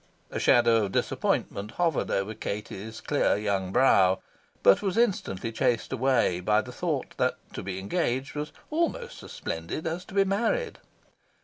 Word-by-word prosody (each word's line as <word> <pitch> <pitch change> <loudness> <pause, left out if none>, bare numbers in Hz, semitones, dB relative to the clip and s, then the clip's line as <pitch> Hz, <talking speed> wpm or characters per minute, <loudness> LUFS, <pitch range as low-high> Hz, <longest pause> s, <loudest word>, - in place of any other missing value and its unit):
A - - -3
shadow 115 -3 +4
of 95 - -6
disappointment 100 +2 -1
hovered 165 -5 0
over 100 +3 -1
Katie's 105 +1 -6
clear 145 - +2
young 100 -3 -1
brow, 95 -6 +5 0.5
but 100 - +6
was 195 0 -1
instantly 180 - 0
chased 115 +2 0
away 125 -8 +2
by 105 +4 +2
the - - -9
thought - - -3
that - - +1 0.2
to - - -5
be 95 0 -4
engaged 130 - -1
was 150 0 -4 0.2
almost 340 +9 -1
as - - -11
splendid 85 - -4
as 165 +2 -2
to 195 - -12
be 195 - +5
married. 235 - 0
115 Hz, 155 wpm, -27 LUFS, -, 0.5 s, but